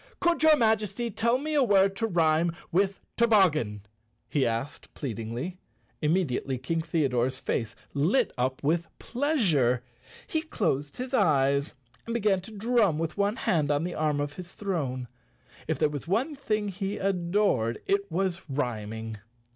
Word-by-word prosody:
"Could 345 -1 +2
your 315 -1 +7
Majesty 220 -1 +1
tell 235 +4 +2
me 305 +3 -3
a 295 - +4
word 195 -5 +4
to 225 - 0
rhyme 165 -2 +2 0.2
with 195 +2 +1 0.2
toboggan?" 155 - +3 0.4
he 140 -4 +1
asked 115 +6 -4
pleadingly. 120 - -4 0.4
Imm 155 +4 +3
e 190 - +2
diately 130 0 -2
King 165 +5 0
Theodore's 130 -6 0
face 115 -3 -2 0.2
lit 190 - +2
up 130 +2 -1
with 165 +4 +1
pleasure. 180 - +1 0.4
He 315 - -1
closed 155 - -2
his 255 +1 -5
eyes 140 - +2 0.3
and 230 - -2
began 205 -4 +2
to 195 - -11
drum 215 -5 +2
with 165 0 -2
one 205 +1 +1
hand 155 - +1
on 145 +1 +1
the 175 0 -3
arm 150 -2 0
of 145 0 -2
his 180 +1 -9
throne. 140 -11 -2 0.6
If 160 - 0
there 155 - +3
was 145 +1 -6
one 240 - 0
thing 215 -6 -1
he 195 +1 -3
adored 180 - +1
it 200 -1 0
was 185 +1 -1
rhyming. 110 -5 -3
170 Hz, 155 wpm, -28 LUFS, 140-210 Hz, 0.6 s, your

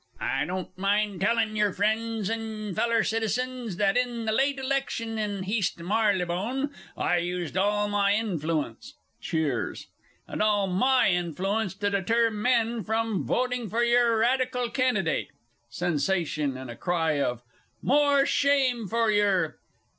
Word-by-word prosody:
I 135 +2 0
don't 185 +1 -5
mind 200 0 0
tellin' 220 +1 +1
yer, 210 -1 +2
friends 220 +1 0
and 220 -3 -4
feller 230 +1 +2
citizens, 230 0 -2
that 195 +1 +2
in 245 -2 -1
the 220 - 0
late 275 +5 +1
election 260 -4 -2
in 205 -2 -2
Heast 200 0 -1
Marylebone, 205 +7 0 0.3
I 175 - +1
used 175 -1 -3
all 205 +2 +1
my 205 -1 +2
influence 165 - -2 0.3
(cheers) 150 -7 -2 0.4
all 210 -2 +1
my 200 +5 +3
influence 190 +4 -1
to 205 0 -1
deter 225 +4 +2
men 230 +1 +1
from 220 0 -1
voting 250 -3 -1
for 235 +4 +1
your 235 -1 +3
Radical 250 +1 +1
candidate. 250 -10 0 0.4
(_Sensation, 155 -2 -1
and 130 -2 -7
a - - -8
cry 160 -3 0
of 125 -2 -2 0.4
"More 285 0 +4
shame 270 -7 +2
for 230 +1 +1
yer!" 200 -6 +1
210 Hz, 130 wpm, -27 LUFS, 180-235 Hz, 0.4 s, More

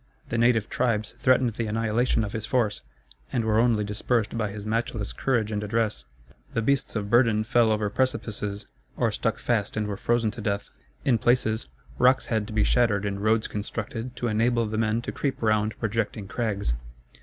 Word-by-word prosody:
The 115 - -1
native 115 -3 +3
tribes 115 -4 0
threatened 130 -2 +3
the 115 0 -3
annihilation 115 +2 +1
of 105 - -5
his 110 0 -4
force, 115 -5 +1 0.5
and 115 -2 0
were 110 0 +3
only 115 -3 +3
dispersed 105 +2 -1
by 110 -2 -1
his 105 0 -7
matchless 115 -1 -2
courage 115 -5 0
and 105 0 -2
address. 110 - -1 0.5
The 115 - +1
beasts 140 +1 +1
of 100 -2 -3
burden 115 -3 +4
fell 115 0 +3
over 105 -1 +1
precipices, 110 -5 -1 0.3
or - - +2
stuck - - -1
fast 110 -3 -1
and 110 - 0
were 100 -1 -3
frozen 115 0 +1
to 115 - -8
death. 100 -1 -2 0.3
In 120 -5 +3
places, 110 -1 +2 0.3
rocks 130 +1 +4
had 110 -4 -1
to 110 - -7
be 105 -1 +3
shattered 110 -5 +2
and 100 -1 -2
roads 110 +1 +2
constructed 115 +3 -5
to 120 - -2
enable 115 +1 +2
the 110 0 -2
men 110 +1 +1
to - - -4
creep 140 -2 -2
round 110 -1 +1
projecting 110 -1 -2
crags. 100 - -1
110 Hz, 185 wpm, -26 LUFS, 105-120 Hz, 0.5 s, burden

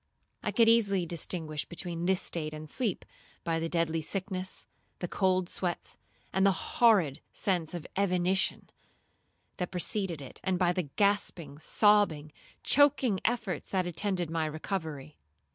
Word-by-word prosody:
I - - -2
could 230 -1 +4
easily 200 -6 +4
distinguish 160 -3 -3
between 175 -1 -4
this 190 -1 +2
state 155 -2 -2
and 155 0 -8
sleep, 215 - -2 0.4
by 165 -1 0
the 165 0 -2
deadly 165 -1 0
sickness, 185 +2 -3 0.3
the 175 - -4
cold 185 -1 +1
sweats, 175 -1 -3 0.4
and 190 - +2
the 195 - +6 0.3
horrid 200 - +5
sense 175 -5 0
of 170 - -6
evanition, 190 -1 +1 0.9
that 180 - -2
preceded 185 -2 -1
it, 135 - -10
and 190 -1 +1
by 180 -1 +3
the 175 -5 -2
gasping, 180 -8 0
sobbing, 200 -6 +3 0.3
choaking 275 -8 +4
efforts 220 -8 -1
that 185 -2 0
attended 175 -1 -2
my 160 -1 0
recovery. 155 -3 -5
180 Hz, 140 wpm, -30 LUFS, 160-195 Hz, 0.9 s, the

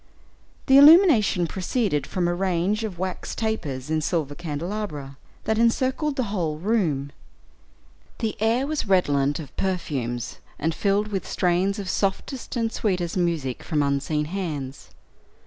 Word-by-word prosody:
The 270 +1 +7
illumination 285 - +7
proceeded 185 - -1
from 180 -2 -1
a 175 - +1
range 190 +3 0
of 205 -5 -4
wax 185 +1 -4
tapers 155 - -3
in 160 0 +1
silver 155 -3 -1
candelabra, 155 -2 -5 0.3
that 220 0 0
encircled 260 +5 +1
the 235 -7 -2
whole 160 -6 -1
room. 160 -8 0 1.1
The 220 -2 -2
air 230 +4 +2
was 300 -5 -2
redolent 145 -7 +2
of 150 -4 -9
perfumes, 140 -11 -2 0.2
and 160 +2 -1
filled 200 +4 +1
with 195 -2 -3
strains 185 +2 +1
of 200 -2 -5
softest 200 +9 -2
and 230 -2 0
sweetest 180 -7 -1
music 165 -8 -1
from 150 -2 0
unseen 140 +2 0
hands. 150 -6 -5
180 Hz, 135 wpm, -24 LUFS, 150-215 Hz, 1.1 s, The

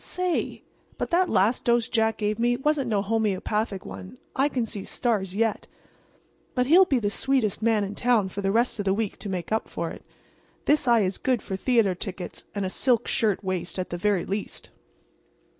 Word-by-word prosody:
Say! 365 -1 -2 0.3
but - - -3
that 360 +1 +3
last 210 +7 +2
dose 235 -1 +3
Jack 220 -1 +1
gave 210 +1 -1
me 240 +1 +2
wasn't 275 -1 0
no 205 -3 +1
homeopathic 210 -1 -1
one. 95 +4 -9 0.2
I 275 +2 +3
can 250 -4 -1
see 210 -3 -6
stars 200 -6 -1
yet. 225 0 0 0.9
But 250 -1 +2
he'll 350 +8 +7
be 275 -7 +1
the 205 -4 0
sweetest 240 -3 0
man 220 -2 +2
in 200 0 -4
town 225 -3 +2
for 200 - -5
the 195 0 +1
rest 235 +1 +1
of 205 - -2
the 190 0 +2
week 220 -2 -2
to 205 - -6
make 180 -1 -4
up 220 - 0
for - - -3
it. - - -10 0.6
This 295 -3 +3
eye 235 -2 +5
is 190 -1 -1
good 255 -4 0
for 190 - -4
theater 225 -2 +2
tickets 180 0 -6
and 200 -1 -1
a - - -1
silk 240 0 +2
shirt 210 -3 +1
waist 185 -2 -3
at 185 - -3
the - - -2
very 195 0 +1
least." 200 +1 -5
220 Hz, 200 wpm, -26 LUFS, 195-245 Hz, 0.9 s, he'll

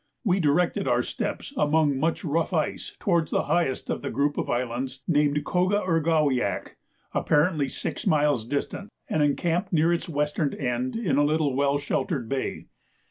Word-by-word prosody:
We 195 -4 +2
directed 170 +2 +1
our - - +2
steps - - -4
among 150 - +2
much 165 +6 0
rough 165 +4 0
ice 155 -3 -2
towards 170 -5 +1
the - - +1
highest 165 -7 0
of - - -2
the - - -3
group 145 +1 0
of - - -3
islands 125 +2 -2
named 150 -2 +2
Coga 185 +3 +1
ur 165 -2 +3
ga 160 -1 +2
wiak, 130 -8 0 0.4
apparently 150 -2 +2
six - - -4
miles 145 -6 +3
distant, 145 - -3 0.2
and 155 - 0
encamped 170 +6 +1
near 165 0 +3
its 170 - -3
western 150 -1 -1
end 125 -1 -2
in 225 -11 0
a 145 - +4
little 150 -2 +1
well 140 +1 +2
sheltered 145 - -2
bay. 135 +2 -3
150 Hz, 170 wpm, -26 LUFS, 140-170 Hz, 0.4 s, a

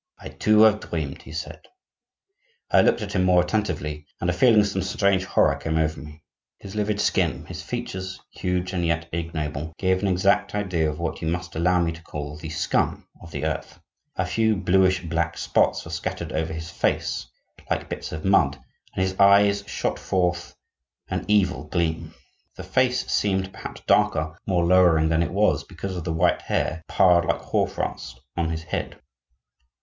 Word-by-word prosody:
"I, - - -9
too, 110 0 +3
have 110 -1 +6
dreamed," 75 -8 -4
he - - -12
said. 80 +1 -6 1.1
I - - +6
looked 110 - +2
at 100 -1 -6
him 90 - +2
more 90 -1 +4
attentively, 90 -7 -2
and 90 - 0
a - - -1
feeling 110 +3 +5
of - - +1
some 95 -1 -2
strange 95 0 +1
horror - - +3
came 80 0 -2
over 80 -1 0
me. 75 +2 -12 0.3
His 100 - -10
livid 105 -1 -1
skin, - - +1
his - - -7
features, 95 0 -5
huge 90 0 -2
and 90 -2 -1
yet 85 0 0
ignoble, 80 -2 -4
gave 95 -1 +1
an 100 - +1
exact 95 +2 +2
idea 90 -6 0
of 75 - -5
what 85 0 -4
you 80 - -2
must 90 0 -3
allow 90 +2 +2
me 85 -1 +1
to 85 +1 -10
call 75 -2 -6
the 75 +1 -8
scum 80 0 -1
of 85 - -11
the 80 - -4
earth. 80 -1 -4 0.4
A 95 - 0
few 110 +4 +1
bluish 95 -1 +2
black 85 0 -1
spots - - +1
were - - -8
scattered - - -4
over 80 0 -1
his 80 +1 -6
face, - - -1 0.4
like - - -1
bits - - -6
of 80 0 -6
mud, 85 -8 +4 0.4
and 95 - +1
his 95 0 -1
eyes 100 0 +5
shot - - -2
forth 90 -2 -1 0.5
an - - -2
evil 100 -3 +2
gleam. 85 -2 -2 0.4
The - - -8
face 125 -1 +1
seemed, 95 -2 0
perhaps, - - -8
darker, 80 +2 +2
more 90 -3 +2
lowering 85 -3 +5
than 80 0 +2
it 85 - -1
was, 105 +3 +2
because 95 +1 -6
of 85 - -5
the 85 - -1
white 85 +2 +2
hair 80 +2 -1
piled 90 -2 +4
like - - 0
hoarfrost - - -2 0.2
on 85 -2 0
his 80 0 -4
head. - - -4
90 Hz, 185 wpm, -24 LUFS, 80-95 Hz, 1.1 s, have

